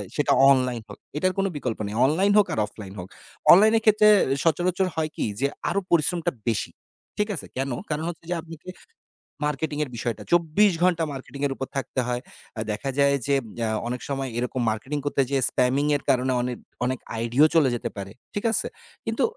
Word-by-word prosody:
সেটা 145 - +1 0.2
অনলাইন 125 -3 +1
হোক। - - -10 0.2
এটার 185 +4 +1
কোন 195 - +1
বিকল্প 125 -5 -3
নেই। 105 - -5
অনলাইন 180 +9 +2
হোক 205 -1 +5
আর - - -1
অফলাইন 100 -2 -10
হোক। 90 - -7 0.4
অনলাইন 215 +5 +7
এর - - 0
ক্ষেত্রে 215 -1 +5 0.4
সচরাচর 180 +3 +1
হয় 160 -1 -1
কি - - -1
যে 140 - +2 0.2
আরো 200 - +1
পরিশ্রমটা 170 +1 +2 0.2
বেশি। 110 - -1 0.5
ঠিক 210 +1 +1
আছে? 150 - -5
কেন? 135 +1 -1 0.2
কারণ 150 0 -2
হচ্ছে 170 -1 -9
যে - - +1 1.1
মার্কেটিং 150 +1 -2
এর 145 - -6
বিষয়টা। 115 0 -3
চব্বিশ 175 +4 +4
ঘন্টা 175 -2 +3
মার্কেটিং 135 +1 -8
এর 135 - -3
উপর 135 - -5
থাকতে 135 -1 -3
হয়। 125 0 -1 0.4
আ - - -4
দেখা 105 +6 -3
যায় 140 0 +4
যে 140 - +3 0.3
আ - - 0 0.2
অনেক 125 +1 -3
সময় 135 -1 -2
এরকম 125 +1 -2
মার্কেটিং 130 +7 -3
করতে 145 -1 +1
যেয়ে 135 -2 +1
স্প্যামিং 130 +3 +1
এর - - -16
কারণে 130 -1 +2
অনেক 125 -1 -3 0.3
অনেক 130 0 -1 0.2
আইডিইএও 120 +7 +4
চলে 150 -5 +5
যেতে 120 0 -3
পারে। 100 0 -6 0.2
ঠিক 205 - -3
আছে? - - +1 0.4
কিন্তু - - -1
140 Hz, 190 wpm, -25 LUFS, 125-170 Hz, 1.1 s, অনলাইন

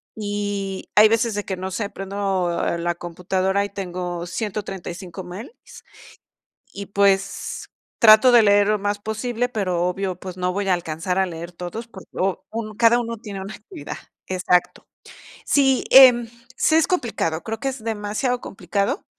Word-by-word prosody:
y, 205 -2 -4
hay 215 +1 +8
veces 225 -1 +1
de 205 - -3
que, 190 - -3
no 190 +1 -4
sé, 205 +1 -3
prendo 195 -2 -2 0.3
la 175 0 -1
computadora 185 +3 -1
y - - -7
tengo 180 -3 -5
135 190 -3 -5
mails 195 - -9 1.2
y, 200 0 -6
pues, 200 -1 0 0.3
trato 225 +2 +7
de 235 -2 +7
leer 205 -1 +5
lo 215 0 +2
más 205 +1 -1
posible, 230 +3 -2
pero 185 -6 -1
obvio, 185 0 -2
pues, 185 -1 -8
no 180 0 0
voy 200 0 -2
a 185 - +4
alcanzar 175 +2 -3
a 190 - +3
leer 170 0 -7
todos, 180 +7 -7
porque 190 -5 -13
u 190 0 0
un 215 -2 -5
cada 235 +1 +5
uno 230 -1 -4
tiene 200 -4 -7
una 195 +3 -7
actividad, 315 - -9 0.3
exacto, 180 -1 0 0.6
sí, 270 -2 +3
em, 250 -3 +8 0.3
sí 315 - +3
es 325 - +4
complicado, 220 - -1
creo 225 0 -4
que, 270 - 0
es 260 -3 -7
demasiado 225 +3 -2
complicado, 200 - -2
200 Hz, 160 wpm, -22 LUFS, 185-225 Hz, 1.2 s, hay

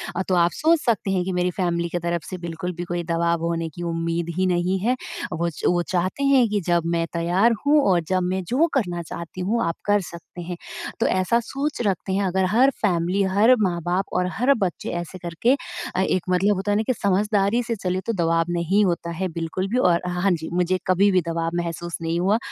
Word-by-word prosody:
अ, 185 - 0
तो 185 - +2
आप 170 0 +4
सोच 325 +2 +3
सकते 215 -5 +1
हैं 185 -2 +1
कि 190 - -2
मेरी 180 0 +1
फैमिली 170 -2 -1
के 175 - -2
तरफ 170 -1 -2
से 185 - -5
बिल्कुल 170 0 -5
भी 175 - -3
कोई 175 0 -3
दबाव 170 0 0
होने 165 -1 -1
की 175 +3 -8
उम्मीद 165 0 -2
ही 185 - +2
नहीं 180 +1 +1
है। 240 +6 +1 0.4
वो 170 +2 0
च 160 - -10 0.2
वो - - +2
चाहते 185 +9 -1
हैं 270 -3 +5
कि 210 0 0
जब 170 -1 +2
मैं 165 0 +1
तैयार 175 +7 +2
हूँ 295 +1 +5
और 180 -2 +4
जब 185 +1 +1
मैं 185 +1 -1
जो 290 +7 +3
करना 180 -10 0
चाहती 170 +2 -7
हूँ 220 +6 0
आप 165 0 -1
कर 205 0 +3
सकते 175 0 -10
हैं, 175 0 -5 0.4
तो - - +2
ऐसा 185 +6 +2
सोच 275 +3 -3
रखते 190 0 -1
हैं। 200 +1 +1
अगर 190 0 +1
हर 245 +6 +5
फैमिली, 180 -1 +1
हर 205 +6 +4
माँ-बाप 180 0 0
और 180 0 +1
हर 250 +5 +3
बच्चे 180 -3 -3
ऐसे 175 +2 -8
करके 175 +10 +1 0.4
अ, 185 - +2
एक 185 -1 +1
मतलब 190 +3 +3
होता 195 +2 -2
है - - +2
ना 215 - +1
कि 255 - +3
समझदारी 200 +3 +2
से 230 0 -2
चलें 185 -2 -2
तो 230 - -1
दबाव 165 -3 +1
नहीं 175 +4 +2
होता 170 -2 -1
है 190 - 0
बिल्कुल 165 +3 -2
भी। 240 - 0
और 175 -8 +3
हाँ, 180 0 -2
हाँ, 195 +1 +3
जी। 160 -2 -2
मुझे 180 +1 +1
कभी 190 +2 +4
भी 185 -1 +3
दबाव 165 0 -1
महसूस 170 0 -5
नहीं 165 +1 -1
हुआ 195 +5 +3
180 Hz, 230 wpm, -23 LUFS, 170-200 Hz, 0.4 s, हैं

